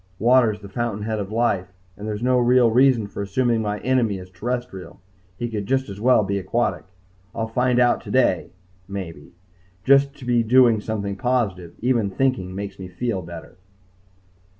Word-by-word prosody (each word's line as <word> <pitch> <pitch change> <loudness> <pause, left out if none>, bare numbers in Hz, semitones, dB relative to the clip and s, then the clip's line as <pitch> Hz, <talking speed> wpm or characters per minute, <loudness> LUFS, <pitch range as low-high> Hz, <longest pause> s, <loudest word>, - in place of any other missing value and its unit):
Water's 115 -2 +3
the 100 - -9
fountainhead 110 0 -3
of 100 0 -5
life, 105 -6 0 0.2
and 105 +2 -8
there 105 - -2
is 105 - -6
no 125 0 +3
real 120 -1 +4
reason 125 -2 +4
for 100 - -7
assuming 115 +3 0
my 105 -1 -2
enemy 120 -5 +1
is 90 0 -11
terrestrial. 110 -1 -5 0.4
He 120 - -3
could 105 -4 -4
just 130 -1 0
as 100 +1 -8
well 125 -2 +4
be 100 0 -1
aquatic. 115 +6 -1 0.5
I'll 115 - -1
find 125 +2 +1
out 120 -1 +3
today 125 -9 +1 0.4
maybe. 95 -5 -7 0.5
Just 140 +1 +4
to 125 - -11
be 120 -1 +2
doing 115 -1 +4
something 100 -2 -4
positive 105 -9 -1
even 120 -4 +1
thinking 95 -4 -1
makes 100 0 -6
me 95 - -7
feel 95 +2 -3
better.... 85 -1 -10
110 Hz, 170 wpm, -22 LUFS, 100-125 Hz, 0.5 s, real